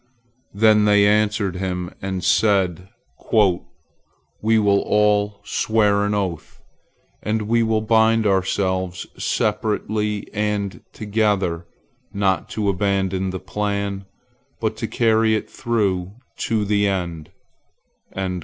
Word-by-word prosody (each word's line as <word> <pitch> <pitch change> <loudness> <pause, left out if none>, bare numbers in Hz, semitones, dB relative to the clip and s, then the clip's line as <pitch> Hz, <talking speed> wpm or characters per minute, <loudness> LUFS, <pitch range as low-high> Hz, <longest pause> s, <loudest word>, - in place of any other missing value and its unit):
Then 105 0 +4
they 105 -1 +5
answered 105 -2 +1
him, 90 -1 -3
and 95 -1 -3
said: 95 -4 +2 0.4
"We 110 +2 -1
will 100 -2 +3
all 105 -1 +1
swear 105 -1 +1
an 105 0 0
oath, 95 -5 -4 0.6
and 110 0 -1
we 115 +2 +2
will 110 -1 +1
bind 110 0 +3
ourselves, 95 -2 0 0.2
separately 105 0 -1
and 105 -2 -2
together, 100 -6 -1 0.4
not 95 -2 0
to 105 -2 -2
abandon 95 -1 0
the 95 0 -4
plan, 100 0 -3 0.5
but 110 -1 -1
to 115 - -3
carry 110 -1 +2
it 110 - -3
through 100 -6 -1 0.3
to 110 -2 0
the 100 0 +2
end." 85 -5 -3
105 Hz, 105 wpm, -21 LUFS, 95-110 Hz, 0.6 s, they